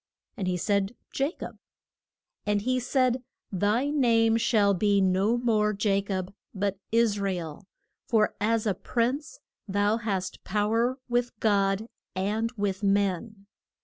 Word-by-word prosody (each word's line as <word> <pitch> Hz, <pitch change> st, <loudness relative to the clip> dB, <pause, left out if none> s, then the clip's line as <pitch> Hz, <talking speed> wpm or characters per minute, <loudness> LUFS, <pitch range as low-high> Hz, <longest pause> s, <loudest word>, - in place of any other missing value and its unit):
And 190 Hz, -, -3 dB
he 180 Hz, -1 st, 0 dB
said, 200 Hz, +3 st, 0 dB, 0.2 s
Ja 275 Hz, +2 st, +1 dB
cob. -, -, -7 dB, 0.9 s
And 205 Hz, -1 st, 0 dB
he 255 Hz, +2 st, +1 dB
said, 255 Hz, 0 st, +1 dB, 0.3 s
Thy 210 Hz, +9 st, +1 dB
name 230 Hz, -5 st, +3 dB
shall 215 Hz, -3 st, +3 dB
be 200 Hz, +1 st, +2 dB
no 190 Hz, +4 st, +2 dB
more 215 Hz, -3 st, +1 dB
Ja 200 Hz, -2 st, +2 dB
cob 190 Hz, -1 st, -4 dB, 0.2 s
but 200 Hz, 0 st, -1 dB
Is 225 Hz, -2 st, +3 dB
ra 200 Hz, 0 st, 0 dB
el, 175 Hz, +2 st, -7 dB, 0.4 s
for 220 Hz, -3 st, +2 dB
as 225 Hz, +1 st, +1 dB
a 205 Hz, -, +2 dB
prince 255 Hz, -, -2 dB, 0.3 s
thou 205 Hz, +2 st, +2 dB
hast 195 Hz, -5 st, -3 dB
pow 210 Hz, +2 st, 0 dB
er 240 Hz, +3 st, +1 dB
with 240 Hz, -2 st, -1 dB
God 200 Hz, -1 st, +2 dB, 0.3 s
and 210 Hz, +4 st, -1 dB
with 200 Hz, -1 st, -1 dB
men. 200 Hz, +1 st, 0 dB
210 Hz, 145 wpm, -27 LUFS, 195-230 Hz, 0.9 s, name